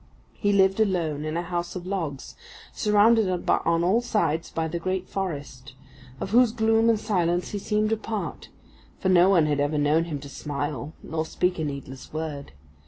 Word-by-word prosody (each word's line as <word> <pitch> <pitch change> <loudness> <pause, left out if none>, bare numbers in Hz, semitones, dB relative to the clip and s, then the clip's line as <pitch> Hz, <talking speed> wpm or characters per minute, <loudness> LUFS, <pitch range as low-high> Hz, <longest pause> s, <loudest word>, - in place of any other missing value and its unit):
He 205 - 0
lived 195 0 +3
alone 165 -8 0
in 155 +1 -2
a 170 - -1
house 175 0 -3
of 180 -1 -6
logs 165 -8 -4 0.4
surrounded 210 0 +4 0.2
on 170 0 +2
all 200 +7 +3
sides 170 -9 0
by 160 0 -2
the 170 +2 -3
great 185 +1 -2
forest, 140 -9 -5 0.4
of 190 - -4
whose 240 0 +5
gloom 225 0 +3
and 225 -2 +3
silence 175 -4 0
he 205 - -3
seemed 215 +2 0
a 225 - +2
part, 215 -1 -5 0.5
for 190 - -1
no 180 0 +6
one 175 -5 +5
had 145 -1 0
ever 145 +2 0
known 150 +3 +2
him 160 -4 -4
to 140 - -9
smile 145 0 -4
nor 160 0 -2
speak 180 +2 -1
a - - -1
needless 140 -3 -6
word. 155 - -5
175 Hz, 180 wpm, -25 LUFS, 150-205 Hz, 0.5 s, no